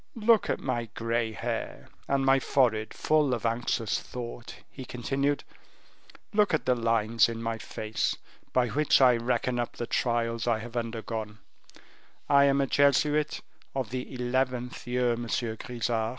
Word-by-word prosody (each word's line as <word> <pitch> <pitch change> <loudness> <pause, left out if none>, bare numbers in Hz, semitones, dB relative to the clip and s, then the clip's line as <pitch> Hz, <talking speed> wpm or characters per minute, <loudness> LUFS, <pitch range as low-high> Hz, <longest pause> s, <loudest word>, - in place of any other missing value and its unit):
"Look 225 -1 +3
at - - 0
my 120 -3 -2
grey 115 0 -1
hair, 110 - -4 0.2
and 135 -1 +1
my 135 0 +5
forehead, 115 -5 +1
full 150 -4 +2
of 115 - -6
anxious 115 -1 0
thought," 120 -1 -7
he 130 - -9
continued: 135 +4 -1 0.9
"look 205 -5 +3
at 155 - -3
the 125 - +4
lines 115 -1 +2
in 115 -1 -5
my 115 0 -3
face, 110 0 -2 0.3
by 125 -2 +2
which 150 +5 +3
I 125 -2 +6
reckon 120 +1 0
up 120 - -2
the 120 - -2
trials 115 -1 0
I 115 -2 +3
have 115 +2 -9
undergone; 115 -2 -4 0.9
I 140 0 +6
am 140 0 +3
a - - +2
Jesuit 145 +2 +2 0.3
of 130 -5 -2
the 130 0 -4
eleventh 125 -1 -2
year, 125 -1 +1
Monsieur 115 -1 -2
Grisart." 115 -1 -2
120 Hz, 150 wpm, -28 LUFS, 115-135 Hz, 0.9 s, I